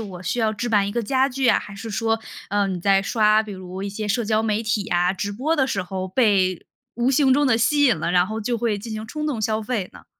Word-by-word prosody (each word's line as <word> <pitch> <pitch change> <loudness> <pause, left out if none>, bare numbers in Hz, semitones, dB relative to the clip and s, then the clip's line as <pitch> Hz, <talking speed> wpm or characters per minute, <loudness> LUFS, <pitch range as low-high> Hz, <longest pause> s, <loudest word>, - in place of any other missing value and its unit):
我 190 -5 -8
需 185 +7 -2
要 220 -2 +1
置 240 +3 -3
办 205 -3 +2
一 - - -5
个 235 +1 -1
家 265 +4 +2
具 265 0 -1
啊， - - +5
还 200 - -10
是 220 +3 -7
说， 225 +2 0 0.3
呃， 205 0 +1
你 185 -2 -3
在 195 +1 +3
刷 215 0 +3
比 215 -1 -8
如 185 0 -7
一 200 - -3
些 210 +2 -5
社 225 +3 0
交 215 0 +1
媒 220 0 0
体 215 -2 -1
啊、 175 +1 +2
直 200 +2 -4
播 270 +10 0
的 265 - +2
时 195 -7 -2
候 185 +1 -5
被 190 -5 +1 0.3
无 240 +2 +1
形 270 0 +4
中 285 +2 +3
地 225 -3 +3
吸 290 +5 +3
引 245 - +4
了， 155 - -2
然 180 0 +3
后 220 +2 -4
就 235 +2 -1
会 220 -3 -1
进 225 +2 -7
行 215 0 -5
冲 305 +5 -4
动 265 -8 -2
消 215 0 0
费 210 -5 -3
呢？ - - -15
215 Hz, 295 characters per minute, -22 LUFS, 195-240 Hz, 0.3 s, 啊